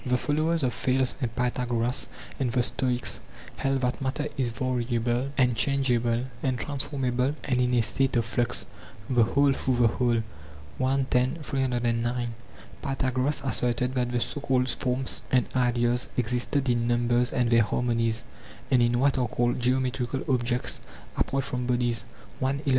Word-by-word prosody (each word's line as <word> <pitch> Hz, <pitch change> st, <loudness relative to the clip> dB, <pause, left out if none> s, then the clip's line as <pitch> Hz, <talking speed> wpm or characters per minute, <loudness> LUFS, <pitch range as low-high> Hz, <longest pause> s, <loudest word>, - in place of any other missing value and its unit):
The 125 Hz, 0 st, +1 dB
followers 155 Hz, +4 st, 0 dB
of 125 Hz, -2 st, +1 dB
Thales 130 Hz, -1 st, +1 dB
and 120 Hz, -2 st, -2 dB
Pythagoras 125 Hz, 0 st, 0 dB, 0.3 s
and 130 Hz, -3 st, 0 dB
the 125 Hz, 0 st, +2 dB
Stoics 125 Hz, -1 st, 0 dB, 0.4 s
held 135 Hz, -1 st, 0 dB
that 125 Hz, +1 st, -1 dB
matter 135 Hz, +3 st, -1 dB
is 130 Hz, -3 st, 0 dB
variable 120 Hz, +1 st, -1 dB
and 125 Hz, -3 st, +3 dB
changeable 120 Hz, -1 st, +1 dB, 0.2 s
and 130 Hz, -2 st, 0 dB
transformable 135 Hz, -1 st, -1 dB
and 125 Hz, -2 st, +1 dB
in 125 Hz, 0 st, +2 dB
a 120 Hz, -, +4 dB
state 135 Hz, +4 st, +1 dB
of 115 Hz, -1 st, +2 dB
flux, 120 Hz, +1 st, 0 dB, 0.4 s
the 125 Hz, -2 st, +3 dB
whole 140 Hz, +5 st, +3 dB
through 130 Hz, -1 st, 0 dB
the 120 Hz, -1 st, +4 dB
whole. 120 Hz, 0 st, +1 dB, 0.6 s
i. 135 Hz, +1 st, +2 dB
10; 125 Hz, +3 st, +2 dB
3809. 120 Hz, -3 st, -1 dB, 0.5 s
Pythagoras 135 Hz, +1 st, 0 dB
asserted 125 Hz, +1 st, 0 dB
that 125 Hz, -2 st, 0 dB
the 125 Hz, -, 0 dB
so 145 Hz, -, -2 dB
called 130 Hz, -2 st, +2 dB
forms 130 Hz, +1 st, 0 dB
and 125 Hz, -2 st, +3 dB
ideas 120 Hz, -1 st, +2 dB
exist 125 Hz, +2 st, 0 dB
in 120 Hz, -1 st, +1 dB
numbers 120 Hz, 0 st, +2 dB
and 120 Hz, -1 st, +1 dB
their 115 Hz, 0 st, +6 dB
harmonies, 115 Hz, 0 st, 0 dB, 0.5 s
and 125 Hz, -2 st, +5 dB
in 120 Hz, 0 st, +3 dB
what 135 Hz, 0 st, +2 dB
are 125 Hz, -, +1 dB
called 120 Hz, +2 st, 0 dB
geometrical 130 Hz, +1 st, 0 dB
objects, 125 Hz, -1 st, 0 dB, 0.4 s
apart 135 Hz, 0 st, 0 dB
from 125 Hz, -2 st, -3 dB
bodies. 120 Hz, -2 st, 0 dB, 0.4 s
i. 135 Hz, +2 st, 0 dB
125 Hz, 155 wpm, -27 LUFS, 120-130 Hz, 0.6 s, their